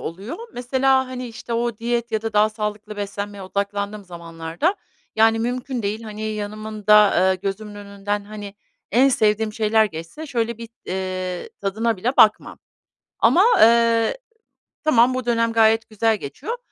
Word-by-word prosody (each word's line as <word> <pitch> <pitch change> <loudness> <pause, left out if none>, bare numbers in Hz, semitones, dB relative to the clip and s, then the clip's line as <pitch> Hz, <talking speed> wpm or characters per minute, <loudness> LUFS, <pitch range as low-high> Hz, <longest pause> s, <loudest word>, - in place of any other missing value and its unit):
oluyor 195 - -6 0.2
mesela, 260 +1 +1
hani, 255 -1 -6
işte, 230 +1 -8
o 235 -1 -1
diyet 235 0 -2
ya 220 0 0
da 225 -1 -3
daha 210 +1 +4
sağlıklı 210 -1 -5
beslenmeye 205 0 -5
odaklandığım 200 +1 -3
zamanlarda, 170 - -3 0.4
yani, 225 0 +4
mümkün 245 +1 -3
değil, 210 +3 -3
hani, 215 -1 -7
yanımda 210 -1 +2 0.2
eee, - - +2
gözümün 200 +2 -5
önünden, 205 0 -4
hani, 205 -1 -9 0.4
en 255 +5 +5
sevdiğim 215 -3 +1
şeyler 220 0 +3
geçse 165 - -7
şöyle 235 -3 -2
bir, 230 -1 -8 0.2
eee, 185 -1 -4
tadına 220 +3 -1
bile 245 +8 -2
bakmam. 215 -1 +4 0.6
Ama, 365 - +5 0.2
eee, 230 - +4 0.7
tamam 250 -4 +4
bu 255 -1 -3
dönem 230 -1 +1
gayet 225 0 +3
güzel 220 0 +1
geçiyor. 310 - -6
215 Hz, 145 wpm, -22 LUFS, 205-235 Hz, 0.7 s, en